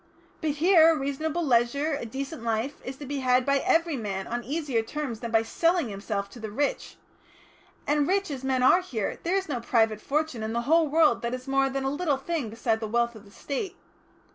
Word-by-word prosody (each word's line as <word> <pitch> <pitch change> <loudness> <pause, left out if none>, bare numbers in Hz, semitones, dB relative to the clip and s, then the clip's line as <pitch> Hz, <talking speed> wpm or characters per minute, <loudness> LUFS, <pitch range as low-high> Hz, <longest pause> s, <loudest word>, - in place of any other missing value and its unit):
But 315 - 0
here 330 0 +6
a 325 - +3
reasonable 310 +4 -2
leisure, 270 +4 +2
a 280 -5 -3
decent 275 +5 -5
life, 230 +5 -2
is 260 +1 -6
to 290 - -8
be 280 +1 -3
had 255 -1 +3
by 280 0 +3
every 330 +2 +2
man 195 -4 -3
on 240 +1 -3
easier 280 -4 -1
terms 250 -1 -5
than 235 - -5
by 225 0 +3
selling 335 +4 +1
himself 200 0 -3
to 245 - -11
the 220 -1 -5
rich. 280 +7 -2 0.9
And 290 0 +2
rich 390 -2 +1
as 265 -2 -5
men 260 -1 +1
are 345 +8 +6
here, 230 - -3
there 350 +3 0
is 385 - -2
no 270 -5 -2
private 225 -2 +1
fortune 300 -4 -1
in 220 +1 -3
the 235 - 0
whole 320 +5 +3
world 300 -4 +3
that 235 +1 -2
is 255 +1 -10
more 270 0 +2
than 270 0 -3
a 270 - 0
little 290 -1 0
thing 280 -3 -3
beside 225 0 -1
the 220 - -4
wealth 235 +2 +1
of 220 -2 -13
the - - -16
State. 285 - -5
270 Hz, 220 wpm, -27 LUFS, 235-305 Hz, 0.9 s, here